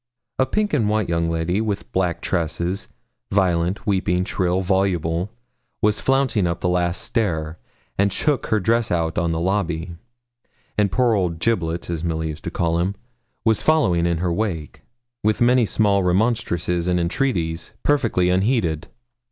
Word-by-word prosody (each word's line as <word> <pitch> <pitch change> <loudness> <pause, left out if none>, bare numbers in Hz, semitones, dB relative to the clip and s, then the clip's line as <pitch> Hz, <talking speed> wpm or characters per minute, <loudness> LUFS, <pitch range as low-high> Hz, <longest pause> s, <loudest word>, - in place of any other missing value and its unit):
A 130 - +3
pink 210 +6 0
and 115 -8 +2
white 110 -2 +1
young 85 0 +1
lady, 85 +5 0
with 105 -3 -3
black 90 -2 0
tresses, 85 +2 -1 0.4
violent, 90 -1 +1
weeping, 95 -2 +1
shrill, 90 -2 0
voluble, 90 -2 0 0.5
was 105 0 +2
flouncing 130 -8 +2
up 85 0 -2
the - - -1
last 90 0 0
stair, 80 -9 -1 0.4
and 100 0 +3
shook 140 +6 0
her 110 - +2
dress 115 +4 +1
out 80 -1 0
on 85 -1 0
the 80 - -1
lobby; 85 -2 -1 0.8
and 105 -2 +2
poor 125 -2 +3
old 90 -5 0
Giblets, 85 -4 -1
as 85 -1 -3
Milly 80 -1 -1
used 75 0 -8
to - - -1
call 85 0 0
him, 95 +3 0 0.5
was 110 -2 +3
following 90 - +3
in 85 -1 +1
her 85 0 0
wake, 85 -6 -3 0.4
with 110 0 +2
many 120 -1 +4
small 100 -2 +2
remonstrances 90 -3 0
and 90 0 +2
entreaties, 85 -4 -1
perfectly 110 -11 +2
unheeded. 95 - +1
90 Hz, 155 wpm, -22 LUFS, 85-110 Hz, 0.8 s, many